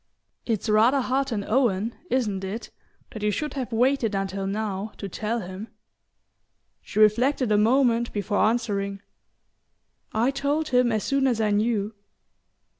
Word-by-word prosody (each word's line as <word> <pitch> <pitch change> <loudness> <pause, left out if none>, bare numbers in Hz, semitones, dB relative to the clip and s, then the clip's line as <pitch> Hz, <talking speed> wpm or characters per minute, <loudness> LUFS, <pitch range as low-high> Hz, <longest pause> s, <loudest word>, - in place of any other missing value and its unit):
"It's 225 -2 -1
rather 220 +6 +4
hard 270 +1 0
on 205 -3 -1
Owen, 225 -2 +1 0.2
isn't 210 -7 0
it, 200 +5 -5 0.4
that 215 - -8
you 210 - +1
should 295 +9 -2
have 260 -3 -4
waited 235 -2 +2
until 195 0 -2
now 205 0 -3
to 200 - -5
tell 220 +5 -3
him?" 190 +3 -7 1.1
She - - -10
reflected 235 +4 +3
a 210 - +4
moment 235 +1 +3
before 205 0 -1
answering. 200 -3 0 1.1
"I 230 +5 +1
told 285 +3 -1
him 250 -1 +3
as 215 -2 0
soon 275 -1 +1
as 240 -4 +1
I 215 -1 +1
knew." 210 0 0
220 Hz, 145 wpm, -25 LUFS, 205-250 Hz, 1.1 s, rather